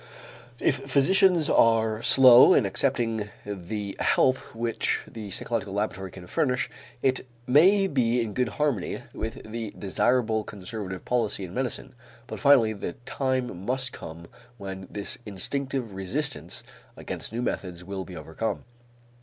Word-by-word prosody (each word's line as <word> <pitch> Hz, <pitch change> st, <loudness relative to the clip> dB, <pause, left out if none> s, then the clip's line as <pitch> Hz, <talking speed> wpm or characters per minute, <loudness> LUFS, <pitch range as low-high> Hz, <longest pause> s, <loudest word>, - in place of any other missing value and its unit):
If -, -, +1 dB
physicians 175 Hz, +3 st, +4 dB
are 110 Hz, -1 st, +3 dB
slow 125 Hz, -1 st, +8 dB
in -, -, +4 dB
accepting 115 Hz, 0 st, 0 dB, 0.2 s
the 100 Hz, +1 st, -5 dB
help 130 Hz, 0 st, +3 dB, 0.2 s
which 115 Hz, 0 st, -1 dB
the 110 Hz, -3 st, -8 dB
psychological 105 Hz, 0 st, -3 dB
laboratory 95 Hz, -2 st, -2 dB
can 90 Hz, -1 st, -11 dB
furnish, 130 Hz, -, 0 dB, 0.3 s
it 130 Hz, -1 st, +1 dB, 0.2 s
may 185 Hz, +10 st, +5 dB
be 125 Hz, -8 st, +1 dB
in 115 Hz, -3 st, -2 dB
good 125 Hz, 0 st, 0 dB
harmony 140 Hz, -11 st, -1 dB
with 110 Hz, +1 st, -5 dB
the 115 Hz, -2 st, -5 dB
desirable 110 Hz, +2 st, +1 dB
conservative 95 Hz, -2 st, -7 dB
policy 115 Hz, -5 st, 0 dB
in 90 Hz, -1 st, -7 dB
medicine, 125 Hz, +1 st, -2 dB, 0.3 s
but -, -, -7 dB
finally 130 Hz, -6 st, +5 dB
the 100 Hz, -4 st, -5 dB
time 130 Hz, -8 st, -2 dB
must 130 Hz, +3 st, -1 dB
come 85 Hz, +1 st, -9 dB, 0.3 s
when 95 Hz, -2 st, -7 dB
this 100 Hz, -1 st, -5 dB
instinctive 130 Hz, +3 st, -2 dB
resistance 120 Hz, +9 st, -2 dB, 0.3 s
against -, -, -5 dB
new 120 Hz, +2 st, -3 dB
methods 90 Hz, -6 st, -4 dB
will 95 Hz, +1 st, -5 dB
be 90 Hz, -1 st, -10 dB
overcome. 80 Hz, +8 st, -4 dB
115 Hz, 135 wpm, -26 LUFS, 100-130 Hz, 0.3 s, slow